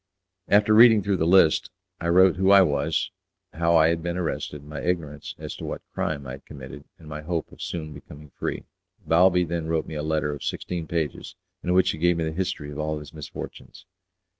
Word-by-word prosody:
After 105 Hz, +1 st, +4 dB
reading 110 Hz, -2 st, +7 dB
through 100 Hz, -1 st, +1 dB
the 80 Hz, -, +1 dB
list, 85 Hz, -3 st, +5 dB, 0.3 s
I 85 Hz, -, -3 dB
wrote 95 Hz, +1 st, +5 dB
who 95 Hz, +1 st, +2 dB
I 100 Hz, -1 st, +8 dB
was, 75 Hz, -1 st, 0 dB, 0.4 s
how 85 Hz, +1 st, +2 dB
I 80 Hz, 0 st, +5 dB
had 85 Hz, 0 st, 0 dB
been 85 Hz, +1 st, -3 dB
arrested, 75 Hz, -4 st, -3 dB
my 75 Hz, 0 st, -7 dB
ignorance 75 Hz, -5 st, -3 dB
as -, -, -7 dB
to -, -, -9 dB
what -, -, -5 dB
crime 70 Hz, -3 st, -2 dB
I 65 Hz, -, -6 dB
had 70 Hz, +2 st, -10 dB
committed, 70 Hz, 0 st, -10 dB
and 80 Hz, -, -15 dB
my 75 Hz, 0 st, -6 dB
hope 80 Hz, +1 st, -3 dB
of -, -, -14 dB
soon 80 Hz, -3 st, -5 dB
becoming 75 Hz, +1 st, -13 dB
free. -, -, -4 dB, 0.4 s
Balbi 90 Hz, +2 st, +4 dB
then 85 Hz, -1 st, -3 dB
wrote 80 Hz, -1 st, 0 dB
me -, -, -8 dB
a 75 Hz, -, -3 dB
letter 75 Hz, -1 st, -1 dB
of 75 Hz, -, -8 dB
sixteen 85 Hz, -3 st, -4 dB
pages, 85 Hz, +2 st, -3 dB, 0.3 s
in 90 Hz, -, 0 dB
which 90 Hz, 0 st, +4 dB
he -, -, -7 dB
gave 85 Hz, +1 st, +3 dB
me 85 Hz, -, -1 dB
the 80 Hz, -, -2 dB
history 80 Hz, -4 st, -3 dB
of 75 Hz, -, -7 dB
all 75 Hz, 0 st, -1 dB
his 75 Hz, -2 st, -10 dB
misfortunes. 75 Hz, -3 st, -9 dB
80 Hz, 215 wpm, -25 LUFS, 75-90 Hz, 0.4 s, I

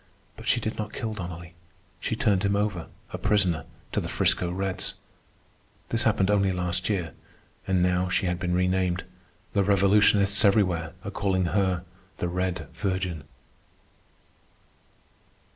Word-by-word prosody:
But -, -, -10 dB
she -, -, +3 dB
did 110 Hz, -, -4 dB
not 105 Hz, -1 st, -4 dB
kill 115 Hz, -3 st, -3 dB
Donnelly. 85 Hz, -3 st, -7 dB, 0.5 s
She -, -, -2 dB
turned 100 Hz, -3 st, +2 dB
him 100 Hz, 0 st, +1 dB
over, 100 Hz, -5 st, -1 dB, 0.3 s
a -, -, -4 dB
prisoner, 90 Hz, -7 st, +1 dB, 0.3 s
to -, -, 0 dB
the -, -, -5 dB
'Frisco 90 Hz, -, +2 dB
Reds. 95 Hz, +1 st, -2 dB, 0.9 s
This 115 Hz, 0 st, +1 dB
happened 105 Hz, -3 st, +3 dB
only 100 Hz, -2 st, +3 dB
last 90 Hz, +1 st, -1 dB
year, 95 Hz, -5 st, -1 dB, 0.6 s
and 95 Hz, -2 st, +2 dB
now 90 Hz, 0 st, +1 dB
she 95 Hz, -, +1 dB
had 90 Hz, -1 st, -1 dB
been 90 Hz, -2 st, 0 dB
renamed. 90 Hz, 0 st, +1 dB, 0.5 s
The 100 Hz, -, +3 dB
revolutionists 100 Hz, 0 st, +4 dB
everywhere 95 Hz, -5 st, +2 dB
are 100 Hz, -, -4 dB
calling 95 Hz, -3 st, 0 dB
her 90 Hz, +1 st, +1 dB, 0.3 s
the 90 Hz, -, -1 dB
"Red 90 Hz, -3 st, -2 dB
Virgin." 95 Hz, -5 st, -2 dB
95 Hz, 140 wpm, -26 LUFS, 90-100 Hz, 0.9 s, revolutionists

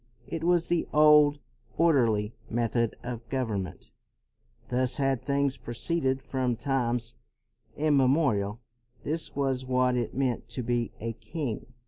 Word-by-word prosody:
It 165 Hz, -1 st, -5 dB
was 175 Hz, -1 st, +3 dB
the 175 Hz, -1 st, 0 dB
old, 150 Hz, -1 st, +6 dB, 0.4 s
orderly 115 Hz, -10 st, +3 dB, 0.2 s
method 115 Hz, 0 st, 0 dB
of 120 Hz, -1 st, -6 dB
government; 110 Hz, -9 st, -3 dB, 0.8 s
thus 125 Hz, 0 st, +1 dB
had 135 Hz, -3 st, +1 dB
things 140 Hz, -1 st, 0 dB
proceeded 130 Hz, +2 st, -1 dB
from 130 Hz, -3 st, -1 dB
times 120 Hz, -3 st, -1 dB, 0.6 s
immemorial; 135 Hz, -7 st, +2 dB, 0.4 s
this 160 Hz, +2 st, -3 dB
was 135 Hz, -2 st, 0 dB
what 125 Hz, -1 st, +2 dB
it 120 Hz, -2 st, -2 dB
meant 130 Hz, -3 st, -1 dB
to 120 Hz, +2 st, -4 dB
be 120 Hz, -1 st, -1 dB
a 115 Hz, +1 st, -3 dB
king. 120 Hz, +1 st, -5 dB
130 Hz, 120 wpm, -28 LUFS, 115-140 Hz, 0.8 s, old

